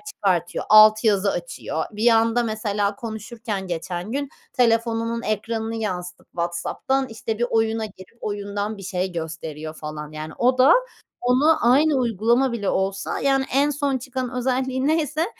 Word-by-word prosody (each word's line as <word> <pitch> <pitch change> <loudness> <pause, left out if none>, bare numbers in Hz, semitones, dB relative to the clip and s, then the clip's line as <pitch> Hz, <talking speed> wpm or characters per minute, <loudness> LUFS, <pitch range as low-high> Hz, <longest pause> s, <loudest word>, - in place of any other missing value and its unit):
çıkartıyor. 185 -4 0
Alt 215 0 +8
yazı 200 -3 +3
açıyor. - - -4
Bir 220 +3 +2
anda 230 +1 +3
mesela 210 -2 -1
konuşurken 220 -2 -5
geçen 175 +3 -4
gün, 280 +1 -2 0.2
telefonunun 230 -1 +1
ekranını 225 +1 -2
yansıtıp 180 -5 -5
WhatsApp'tan, 175 +10 -1
işte 225 -1 -4
bir 240 - +1
oyuna 225 0 +1
girip 190 +1 -14
oyundan 205 +1 -3
bir 195 - -10
şey 185 0 -2
gösteriyor 160 -2 -6
falan. 150 -1 -7
Yani 155 0 -7
o 255 +1 +3
da, 260 +5 +7 0.5
onu 270 +6 +4
aynı 295 +3 +4
uygulama 240 +1 +2
bile 210 -4 -2
olsa, 195 +1 -1
yani, 270 -1 +2
en 280 +2 +3
son 285 -2 0
çıkan 255 0 -4
özelliği 260 +1 0
neyse 310 0 +1
225 Hz, 145 wpm, -23 LUFS, 195-255 Hz, 0.5 s, Alt